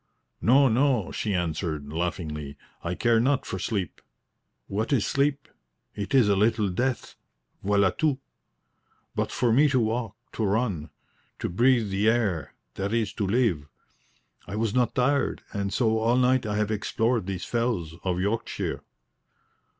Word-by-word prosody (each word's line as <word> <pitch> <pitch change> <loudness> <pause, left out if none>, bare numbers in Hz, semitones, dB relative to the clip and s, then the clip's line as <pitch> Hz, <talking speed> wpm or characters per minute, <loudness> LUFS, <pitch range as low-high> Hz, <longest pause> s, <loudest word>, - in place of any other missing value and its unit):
"No, 135 +4 +5
no," 125 -3 +2
she 105 - -2
answered, 80 -4 -2
laughingly, 75 -4 -3 0.3
"I 85 +1 -2
care 115 +4 +3
not 135 +3 +1
for 95 - -4
sleep. 95 -1 -3 0.6
What 110 +6 -2
is 130 -7 +2
sleep? 140 0 0 0.5
it 105 +7 -2
is 125 -5 +6
a 100 - +3
little 105 0 +2
death 120 +5 -2 0.5
voila 100 -1 +3
tout. 150 - 0 1.0
But - - -1
for 120 -2 +1
me 145 +5 +5
to 130 -2 +2
walk, 115 0 -1 0.2
to 110 - -3
run, 100 -7 0 0.5
to - - -3
beathe 120 +2 +3
the 100 +3 +3
air 110 -8 0 0.2
that 100 +3 -2
is 110 -4 0
to 100 - -2
live. 95 - +1 0.8
I 100 - -5
was 110 -1 0
not 125 -2 +1
tired, 140 +2 +1
and 100 -2 -2
so 110 -1 +2
all 115 +3 +2
night 130 -2 +3
I 105 - -1
have 105 0 0
explored 110 0 0
these 95 -2 -4
fells 115 -9 -1
of 90 -1 -1
Yorkshire." 105 +4 -2
110 Hz, 150 wpm, -26 LUFS, 95-125 Hz, 1.0 s, is